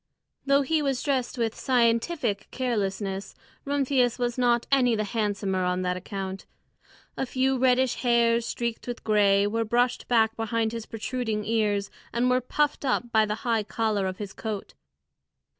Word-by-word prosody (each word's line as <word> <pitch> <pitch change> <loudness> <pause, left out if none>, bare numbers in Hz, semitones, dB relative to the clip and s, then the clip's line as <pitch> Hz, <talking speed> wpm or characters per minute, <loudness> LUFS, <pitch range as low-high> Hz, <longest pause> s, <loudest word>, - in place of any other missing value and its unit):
Though 280 +1 +4
he 310 +3 +1
was 275 -3 -1
dressed 265 -4 -1
with 230 -2 0
scientific 235 -2 +1
carelessness, 200 -5 -2 0.3
Rumphius 270 -4 +1
was 240 -1 -1
not 240 -2 +2
any 250 -4 +4
the 215 - 0
handsomer 200 -3 -1
on 180 0 0
that 180 0 0
account. 190 0 -6 0.7
A 265 - -2
few 265 +1 +1
reddish 255 0 +3
hairs, 235 -1 +3
streaked 235 0 -3
with 240 -1 -5
gray, 200 -2 +4
were 225 +2 0
brushed 240 +3 0
back 225 -2 +3
behind 225 0 -1
his 230 -1 -6
protruding 225 -2 -3
ears, 205 -3 0 0.2
and 245 +2 +1
were 255 0 +3
puffed 295 +4 0
up 245 -3 0
by 220 -1 +4
the 210 - -1
high 230 -2 +2
collar 210 -2 -1
of 185 0 -4
his 205 -2 -6
coat. 215 -3 -5
230 Hz, 160 wpm, -26 LUFS, 210-250 Hz, 0.7 s, Though